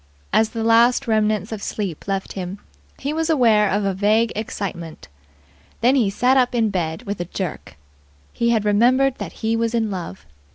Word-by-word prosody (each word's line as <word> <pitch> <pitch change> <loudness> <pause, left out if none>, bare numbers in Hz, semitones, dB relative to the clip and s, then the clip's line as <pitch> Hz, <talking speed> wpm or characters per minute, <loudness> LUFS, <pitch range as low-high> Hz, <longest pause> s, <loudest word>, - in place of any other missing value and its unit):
As 220 0 +3
the 225 -1 -4
last 235 +3 +4
remnants 215 -1 +1
of 215 -2 -5
sleep 195 -7 -5
left 195 -1 -3
him, 185 0 -5 0.4
he 285 +2 -3
was 325 +1 -1
aware 225 -9 +4
of 205 +1 0
a 195 - 0
vague 215 +4 +2
excitement. 170 - -6 0.7
Then 245 +3 +4
he 245 -7 +2
sat 250 +6 +2
up 250 -1 +2
in 225 -3 +1
bed 170 +1 -3
with 205 -4 -5
a 175 - -2
jerk. 175 - -6 0.6
He 235 - 0
had 220 -3 +1
remembered 250 +6 +3
that - - -5
he 225 +1 +2
was 230 0 -1
in 220 -2 0
love. 170 - -6
215 Hz, 180 wpm, -21 LUFS, 195-235 Hz, 0.7 s, last